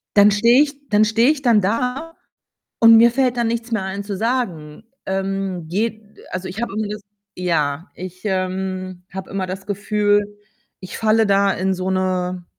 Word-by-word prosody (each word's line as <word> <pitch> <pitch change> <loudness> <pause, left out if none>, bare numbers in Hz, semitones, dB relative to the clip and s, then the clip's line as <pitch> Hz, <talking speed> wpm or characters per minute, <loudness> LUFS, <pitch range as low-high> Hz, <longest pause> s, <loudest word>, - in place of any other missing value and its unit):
Dann 205 0 +7
stehe 235 +6 +5
ich 285 -1 -8
dann 210 0 +4
stehe 230 +6 +3
ich 300 - -3
dann 230 -5 +4
da 250 - -1 0.7
und 230 0 +9
mir 235 +1 +6
fällt 255 0 +1
dann 235 - +1
nichts 230 +1 -3
mehr 215 - 0
ein 190 +1 -4
zu 200 -1 -5
sagen. 205 -9 -2 0.2
Ähm, 190 -3 -3
geht 215 +4 -2 0.3
also, 185 +1 -4
ich 190 +5 -6
habe 235 - -3
immer 215 -1 -1
das 210 0 -6 0.3
ja, 165 -2 -1
ich, 185 0 -9
ähm, 185 -1 -3
habe 190 0 -7
immer 195 -1 -2
das 190 +1 -6
Gefühl, 205 0 +1 0.6
ich 185 - -8
falle 220 0 +3
da 200 0 +3
in 190 +1 -1
so 185 0 -3
'ne 185 -1 -1
200 Hz, 175 wpm, -20 LUFS, 185-225 Hz, 0.7 s, und